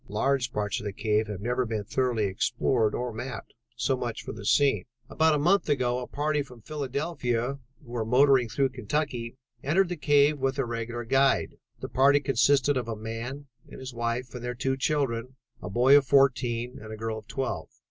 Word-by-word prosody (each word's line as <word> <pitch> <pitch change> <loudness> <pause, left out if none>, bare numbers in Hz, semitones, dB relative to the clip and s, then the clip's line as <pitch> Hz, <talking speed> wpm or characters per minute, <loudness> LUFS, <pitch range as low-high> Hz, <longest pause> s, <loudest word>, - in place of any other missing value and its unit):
Large 130 +4 0
parts 105 -2 -2
of - - -9
the 100 - -3
cave 110 +1 0
have 105 -2 -6
never 125 +3 0
been 110 -3 -3
thoroughly 120 +1 0
explored 110 +3 +1
or 125 -1 -3
mapped. 125 +4 -7 0.2
So 130 +3 +1
much 120 -3 -4
for - - -6
the 105 -2 -9
scene. 135 -10 +3 0.3
"About 160 -1 +3
a - - +2
month 175 +5 +2
ago 125 -3 +1
a 125 - -6
party 150 +1 -1
from 125 -4 -10
Philadelphia 140 -2 -2 0.3
who 120 - -13
were 120 -2 -1
motoring 125 +1 +4
through 135 +5 +1
Kentucky, 125 -1 -3 0.3
entered 175 +6 +2
the 180 - -2
cave 145 -1 +3
with 135 +1 0
a 135 - 0
regular 120 0 -4
guide. 135 +4 +2 0.2
The - - -4
party 140 +2 +4
consisted 140 +1 +3
of 125 - -2
a 115 - -3
man 115 +6 -6 0.2
and - - -10
his 130 -1 -7
wife 120 +1 -3
and 125 -1 -7
their 125 0 -3
two 130 +2 -1
children, 130 -3 -1 0.3
a 90 - -6
boy 125 +7 +5
of 140 -2 +4
fourteen 125 -3 +2
and 110 0 -9
a 110 - -6
girl 110 0 -3
of 110 - -19
twelve. 135 -1 -3
125 Hz, 200 wpm, -27 LUFS, 115-140 Hz, 0.3 s, boy